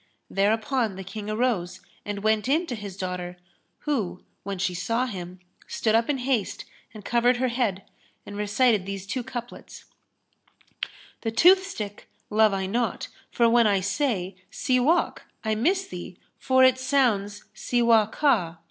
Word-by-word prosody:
Thereupon 220 +2 +1
the 190 - -7
King 210 +2 -7
arose 215 -6 -1 0.3
and 205 -1 -4
went 220 +1 +2
in 320 +5 +2
to 265 - -5
his 200 -3 -8
daughter 180 -1 -4 0.4
who, 205 -12 -2 0.2
when 200 0 -5
she 180 0 -1
saw 230 +8 0
him, 185 -5 -7 0.3
stood 220 - 0
up 230 +3 +2
in 290 - +1
haste 250 -5 -1 0.3
and 215 -3 -12
covered 240 +1 +3
her 255 +1 +1
head,[FN#303] 230 -6 -1 0.4
and 205 - -8
recited 210 0 +2
these 195 -1 -5
two 250 +6 -3
couplets, 240 0 -8 1.4
"The 225 - -1
toothstick 320 - +2 0.2
love 215 0 +5
I 195 -1 -1
not; 230 +5 -2 0.2
for 235 - +3
when 235 -1 +5
I 200 -2 +3
say, 200 -3 -1
* - - -39
'Siwák,'[FN#304] 260 +7 +1 0.3
I 220 - +1
miss 360 - +1
thee, 180 0 -8 0.2
for 260 0 +4
it 260 0 +5
sounds 230 -7 +1
'Siwá 225 -1 +3
ka'. 195 - +1
220 Hz, 150 wpm, -25 LUFS, 195-250 Hz, 1.4 s, love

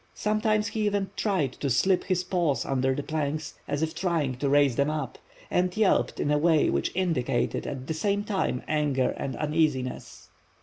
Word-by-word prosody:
Sometimes 215 0 +1
he 215 -1 -1
even 200 -2 -1
tried 180 - 0
to 140 - -1
slip 175 +10 +2
his 185 -2 0
paws 170 -8 0
under 130 0 +1
the 145 - -3
planks, 155 -1 -3
as 145 +2 -1
if 160 0 -1
trying 165 -6 0
to 140 +2 -1
raise 140 -3 +4
them 140 +3 +2
up, 150 -5 -4 0.3
and 180 +2 +1
yelped 215 -3 +2
in 145 - 0
a 150 - +3
way 160 -1 +3
which 70 - 0
indicated 145 -9 0
at 130 -2 -5
the 160 - -2
same 200 +5 0
time 195 -11 -1
anger 145 -4 +1
and 135 - -4
uneasiness. 150 -4 -1
155 Hz, 180 wpm, -27 LUFS, 140-185 Hz, 0.3 s, raise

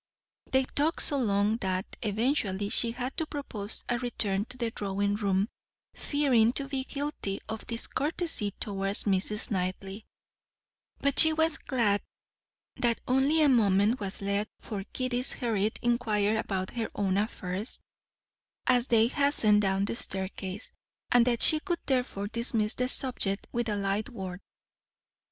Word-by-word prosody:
They 265 0 +4
talked 295 +5 -1
so 285 - 0
long 205 -1 +2
that 190 -3 -2 0.2
eventually 210 -3 0
she 235 - +2
had 245 +3 -4
to 320 -2 -1
propose 225 -9 -5
a 240 0 0
return 210 -5 -1
to 250 +1 -10
the 235 -2 -2
drawing 200 -1 -1
room, 200 -1 +1 0.5
fearing 255 -6 +2
to 275 0 -3
be 265 -1 -3
guilty 280 -10 -3
of 220 0 -6
discourtesy 285 - -1
towards 195 -1 +2
Mrs. 205 +2 +1
Knightley; 190 +2 -3 0.9
but 280 -1 +1
she 315 -1 +7
was 320 -2 +1
glad 215 -7 +1 0.8
that 235 -2 +1
only 275 +5 +3
a - - +6
moment 215 -2 +3
was 200 -1 -4
left 200 +1 -1
for 200 -3 -5
Kitty's 255 0 +1
hurried 220 -3 -1
inquiry 220 -3 +1
about 190 -4 -2
her 230 -2 -3
own 195 -2 0
affairs, 200 0 -2 0.9
as 250 0 +3
they 225 -1 +5
hastened 235 -6 +3
down 195 0 +1
the - - -3
staircase, 190 -1 -4 0.4
and 245 0 +5
that 240 -2 +3
she 310 - +7
could 345 +2 -2
therefore 250 -6 -1
dismiss 230 -1 0
the 250 - -1
subject 245 -7 +1
with 235 -1 -1
a 210 - 0
light 200 +4 -1
word. 190 -6 -7
220 Hz, 145 wpm, -29 LUFS, 200-255 Hz, 0.9 s, she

